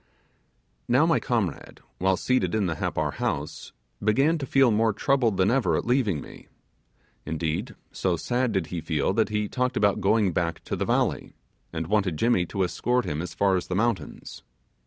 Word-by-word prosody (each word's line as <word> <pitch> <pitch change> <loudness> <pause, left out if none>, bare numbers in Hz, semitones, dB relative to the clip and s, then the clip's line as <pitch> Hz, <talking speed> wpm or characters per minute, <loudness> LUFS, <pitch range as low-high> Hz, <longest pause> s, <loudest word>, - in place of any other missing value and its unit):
Now - - +4
my - - +3
comrade, - - -2 0.2
while 95 0 +2
seated 105 -7 +1
in 105 -2 +1
the 85 -3 -2
Happar - - -1
house, - - -3 0.3
began 135 +10 +3
to 135 - -4
feel 135 -2 +4
more 110 +1 +2
troubled 120 -5 +1
than 95 +3 +3
ever 110 -12 +2
at - - -3
leaving 115 - +1
me; - - -13 0.8
indeed, 85 - -3 0.2
so 90 -3 -1
sad 125 +7 0
did 95 -5 0
he 85 - -2
feel 80 +2 0
that 110 +2 +1
he 105 0 -1
talked 125 +4 -1
about 100 -1 +2
going 100 -1 +2
back 85 -1 -2
to - - -3
the - - -2
valley, - - 0 0.4
and 80 -1 -3
wanted 95 -3 0
Jimmy 105 -3 +2
to 95 +2 -1
escort 120 +7 0
him 75 +2 -2
as 90 - -6
far 100 -1 +2
as 90 - -2
the 90 - -2
mountains. 105 -7 -2
100 Hz, 180 wpm, -26 LUFS, 90-120 Hz, 0.8 s, Now